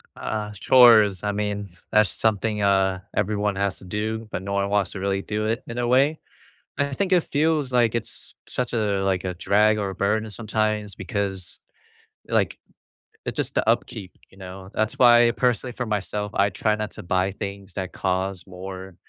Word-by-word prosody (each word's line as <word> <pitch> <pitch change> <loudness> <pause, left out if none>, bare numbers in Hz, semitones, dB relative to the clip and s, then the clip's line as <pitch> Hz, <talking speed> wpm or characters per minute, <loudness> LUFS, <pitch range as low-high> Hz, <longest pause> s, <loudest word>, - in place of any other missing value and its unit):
Uh, 105 -1 -4
chores. 110 -4 +6
I 105 - 0
mean, 100 -1 -3 0.2
that's 105 -2 +4
something, 105 0 0
uh, 95 -1 +2
everyone 105 -1 0
has 100 -1 -1
to - - -13
do, 110 +3 -3
but - - -3
no 100 +1 -5
one 100 0 +1
wants 100 -2 +1
to 95 - -6
really 95 0 -1
do 105 +1 -3
it, 115 +3 -1
in 115 - -6
a 120 0 0
way. 140 +5 +3 0.6
I 140 - +1
think 190 +4 0
it 180 - +5
feels 150 -2 +1
like 120 -2 +3
it's 115 - -6
such 125 -1 -3
a, 105 -4 0
like, 95 -2 0
a 90 - -2
drag 105 +4 +3
or 100 -2 -2
a - - -9
burden 105 +3 0
sometimes, 105 -1 -2
because, 95 -1 -4 0.7
like, - - +1 0.7
it - - -3
just - - -2
the - - +1
upkeep, 95 -3 -1 0.2
you 95 - -19
know? 95 0 -9
That's 110 +1 -1
why, 120 -1 +6
personally 125 0 0
for 125 +1 -4
myself, 105 0 -2
I 100 0 +3
try 105 +3 0
not 105 0 -4
to - - -9
buy 95 +1 0
things 100 -2 -7
that 95 -2 -4
cause 95 0 -2
more, 95 0 -8
105 Hz, 185 wpm, -24 LUFS, 95-110 Hz, 0.7 s, chores